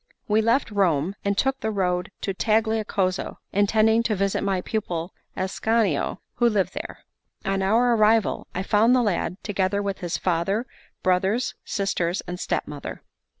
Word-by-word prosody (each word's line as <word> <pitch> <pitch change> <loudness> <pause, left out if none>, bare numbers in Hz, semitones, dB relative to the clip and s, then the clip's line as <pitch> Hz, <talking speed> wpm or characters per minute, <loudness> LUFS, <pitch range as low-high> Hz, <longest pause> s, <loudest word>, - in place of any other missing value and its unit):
We 215 +1 +3
left 230 +2 +2
Rome, 180 -4 +1
and 200 0 0
took 270 +2 +1
the 220 - -2
road 180 -3 0
to 195 - -2
Tagliacozzo, 215 -3 0 0.2
intending 220 +3 +4
to 230 -2 0
visit 195 0 0
my 195 -2 0
pupil 180 -5 -3 0.2
Ascanio, 195 -2 0 0.2
who 240 -1 +4
lived 205 -4 0
there. - - -7 0.4
On 195 0 0
our 230 +5 +3
arrival, 220 0 +3
I 185 - -1
found 220 +5 +4
the 250 - +3
lad, 185 -3 -1
together 200 -1 0
with 200 -1 -2
his 175 -1 -2
father, 190 +6 0 0.4
brothers, 190 +6 +1
sisters, 185 -2 -1
and 180 0 -7
stepmother. 145 -5 -4
200 Hz, 150 wpm, -24 LUFS, 185-220 Hz, 0.4 s, intending